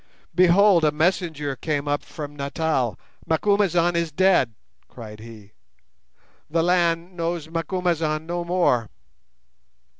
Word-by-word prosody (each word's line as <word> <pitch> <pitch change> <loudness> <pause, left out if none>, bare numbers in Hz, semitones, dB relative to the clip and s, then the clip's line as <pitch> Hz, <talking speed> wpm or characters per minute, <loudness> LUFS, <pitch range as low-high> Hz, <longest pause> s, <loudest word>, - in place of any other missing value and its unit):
Behold! 180 +1 +5
a 150 - +4
messenger 155 -3 -1
came 145 0 -3
up 145 0 0
from 145 -2 -8
Natal, 140 -3 -1 0.3
'Macumazahn 175 -1 +2
is 170 -1 -1
dead!' 175 - +2 0.3
cried 110 -3 -11
he. 110 -2 -13 1.0
'The 165 +1 +1
land 175 0 +1
knows 165 -2 -3
Macumazahn 165 -2 -1
no 175 +1 -3
more. 170 - +1
165 Hz, 110 wpm, -23 LUFS, 145-175 Hz, 1.0 s, Behold